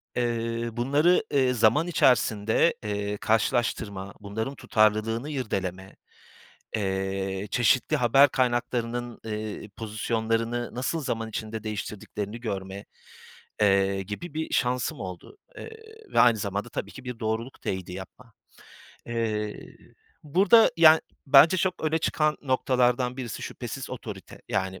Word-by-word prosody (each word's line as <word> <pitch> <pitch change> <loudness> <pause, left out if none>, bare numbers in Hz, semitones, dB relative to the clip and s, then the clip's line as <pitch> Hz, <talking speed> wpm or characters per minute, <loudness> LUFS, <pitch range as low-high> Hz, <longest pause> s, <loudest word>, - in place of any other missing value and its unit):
Eee, 115 -1 -1
bunları, 145 - +3
eee, 130 -3 +3
zaman 120 +9 +3
içerisinde, 115 -2 +3
eee, 105 -1 -2
karşılaştırma, 110 -3 0
bunların 110 +6 -4
tutarlılığını 115 +3 +1
irdeleme, 95 -8 -4 0.8
eee, 95 0 -2
çeşitli 120 +1 +2
haber 135 +4 +5
kaynaklarının, 120 -1 -1
eee, 105 -1 -5
pozisyonlarını 115 +2 -2
nasıl 130 +6 -2
zaman 115 -5 -3
içinde 110 0 -5
değiştirdiklerini 105 +1 -5
görme, 100 -3 -5 0.8
eee, 100 -1 +3
gibi 105 - -7
bir 160 0 -3
şansım 125 -1 0
oldu, 95 - -8 0.2
eee, 455 - -8 0.4
ve - - +4
aynı 120 -2 +6
zamanda 100 +3 -3
tabii - - -5
ki 135 - -11
bir 125 -2 -6
doğruluk 110 +3 -3
teyidi 95 -1 -4
yapma. 95 +6 -10 0.7
Eee, 110 -3 -2 0.6
burada, 195 +9 +5
yani, 160 -1 +8 0.3
bence 145 +7 +7
çok 185 -2 -1
öne 160 +1 +2
çıkan 155 -1 +1
noktalardan 125 -1 +1
birisi 125 -5 -5
şüphesiz - - -6
otorite. - - -8
Yani, 95 0 -2
115 Hz, 115 wpm, -26 LUFS, 105-130 Hz, 0.8 s, yani